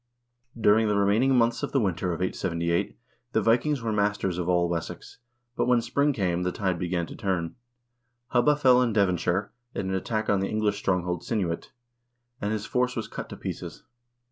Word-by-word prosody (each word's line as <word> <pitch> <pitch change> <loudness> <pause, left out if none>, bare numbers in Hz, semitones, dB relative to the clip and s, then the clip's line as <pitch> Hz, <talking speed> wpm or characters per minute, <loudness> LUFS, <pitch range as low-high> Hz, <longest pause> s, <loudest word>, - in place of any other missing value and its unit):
During 110 +1 +4
the 105 - +1
remaining 110 +7 +3
months 120 -1 +2
of 145 - -4
the 135 - +4
winter 95 -4 0
of 85 - -4
878 85 -2 -1 0.4
the - - +3
Vikings 125 +3 +2
were 110 -1 -1
masters 100 -3 0
of 90 0 -2
all 85 -1 +3
Wessex, 85 +5 -5 0.4
but - - 0
when 125 -1 +4
spring 140 +5 +1
came, 90 -8 0
the 90 0 0
tide 95 -2 -1
began 90 -1 -1
to - - -10
turn. 95 -6 -2 0.7
Hubba 125 +4 +4
fell 130 -3 +5
in 120 -3 +1
Devonshire 95 -1 +1 0.2
in 95 - -2
an 95 - -1
attack 110 +3 -2
on 100 - +3
the 95 - -1
English 105 -1 0
strong 95 -3 0
hold 90 -1 -2
Cynuit, 90 -7 -2 0.7
and 105 - -1
his 110 -1 -2
force 125 0 0
was 115 - -3
cut - - -7
to - - -8
pieces. - - -6
100 Hz, 190 wpm, -26 LUFS, 90-115 Hz, 0.7 s, fell